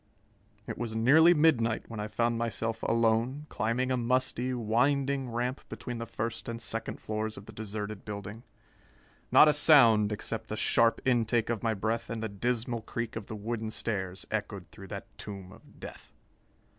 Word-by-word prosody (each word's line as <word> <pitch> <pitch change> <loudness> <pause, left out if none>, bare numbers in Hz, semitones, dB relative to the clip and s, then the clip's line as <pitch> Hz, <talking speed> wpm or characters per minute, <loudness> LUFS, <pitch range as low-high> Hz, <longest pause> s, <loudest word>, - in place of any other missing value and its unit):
It - - -6
was 115 -2 -3
nearly 155 +10 +6
midnight 125 -8 +2
when 115 -2 -7
I 105 - -3
found 115 +2 0
myself 115 -1 -2
alone, 115 +5 +1
climbing 125 +4 -1
a 130 - +2
musty, 125 +1 0
winding 130 +3 +1
ramp 120 +3 -2
between 120 -2 -6
the 115 - -5
first 115 +2 -4
and 115 0 -4
second 115 0 -4
floors 110 0 -3
of 100 - -10
the 110 - -10
deserted 105 -1 -5
building. 100 +1 -7 0.9
Not 155 - +8
a 150 - +5
sound, 120 -9 +6
except 110 +1 -4
the 110 - -4
sharp 115 +1 +3
intake 120 -2 +2
of 115 - -2
my 115 -1 0
breath 110 +3 -2
and 115 0 -4
the 110 - -2
dismal 120 +3 -1
creak 115 +1 -5
of 110 -2 -6
the 110 - -6
wooden 110 +1 -3
stairs, 95 -4 -3
echoed 100 -5 -4
through 100 -2 -11
that - - -8
tomb 95 -3 -7
of - - -17
death. - - -10
115 Hz, 170 wpm, -30 LUFS, 110-120 Hz, 0.9 s, Not